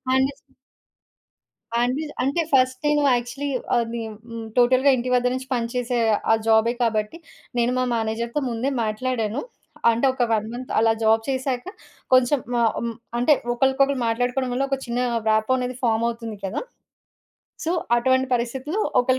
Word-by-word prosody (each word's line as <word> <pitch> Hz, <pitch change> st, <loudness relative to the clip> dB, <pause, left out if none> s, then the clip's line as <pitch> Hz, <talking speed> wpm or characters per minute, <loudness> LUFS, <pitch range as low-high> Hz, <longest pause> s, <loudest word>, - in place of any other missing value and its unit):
అనేసి 270 Hz, +2 st, -1 dB, 1.3 s
అనిపిజ్ 275 Hz, +5 st, -1 dB
అంటే 280 Hz, +6 st, +1 dB
ఫస్ట్ 255 Hz, -1 st, +3 dB
నేను 295 Hz, 0 st, +3 dB
యాక్చువల్లీ 245 Hz, +4 st, -3 dB, 0.3 s
అది 235 Hz, 0 st, -2 dB
హ్మ్, 220 Hz, -1 st, -8 dB
హ్మ్, 230 Hz, -1 st, -6 dB
టోటల్‌గా 255 Hz, +3 st, +5 dB
ఇంటి 250 Hz, +1 st, -3 dB
వద్ద 250 Hz, 0 st, +2 dB
నుంచి 260 Hz, 0 st, -5 dB
పనిచేసే 245 Hz, 0 st, -1 dB, 0.3 s
ఆ -, -, +7 dB
జాబే 225 Hz, +1 st, +4 dB
కాబట్టి, 215 Hz, +5 st, -1 dB, 0.4 s
నేను 240 Hz, +1 st, +2 dB
మా 255 Hz, -, +2 dB
మేనేజర్‌తో 230 Hz, +4 st, -2 dB
ముందే 240 Hz, +3 st, -1 dB
మాట్లాడాను. 225 Hz, +1 st, -2 dB, 0.5 s
అంటే 230 Hz, +4 st, 0 dB
ఒక 260 Hz, -, 0 dB
1 215 Hz, -1 st, 0 dB
మంత్ 255 Hz, +1 st, -7 dB
అలా 225 Hz, 0 st, +4 dB
జాబ్ 220 Hz, 0 st, +4 dB
చేసాక, 260 Hz, -1 st, -2 dB, 0.5 s
కొంచెం 255 Hz, +2 st, +4 dB, 0.2 s
ఆహ్, 230 Hz, -, +3 dB
హ్మ్. 235 Hz, -1 st, -3 dB, 0.2 s
అంటే 245 Hz, +5 st, +4 dB, 0.2 s
ఒకరికొకళ్ళు 270 Hz, +2 st, +2 dB
మాట్లాడుకోవడం 245 Hz, +3 st, 0 dB
వల్ల, 260 Hz, +2 st, 0 dB
ఒక 275 Hz, -, 0 dB
చిన్న 240 Hz, 0 st, -2 dB, 0.3 s
రాపో 220 Hz, +4 st, +2 dB
అనేది 250 Hz, 0 st, -3 dB
ఫార్మ్ 230 Hz, -1 st, +2 dB
అవుతుంది 230 Hz, -2 st, -6 dB
కదా! 190 Hz, -, -3 dB, 1.0 s
సో, 330 Hz, -, 0 dB, 0.2 s
అటువంటి 260 Hz, +2 st, +2 dB
పరిస్థితులు 260 Hz, -, -2 dB, 0.2 s
ఒకళ్ళ 255 Hz, +1 st, +1 dB
245 Hz, 145 wpm, -23 LUFS, 230-260 Hz, 1.3 s, ఆ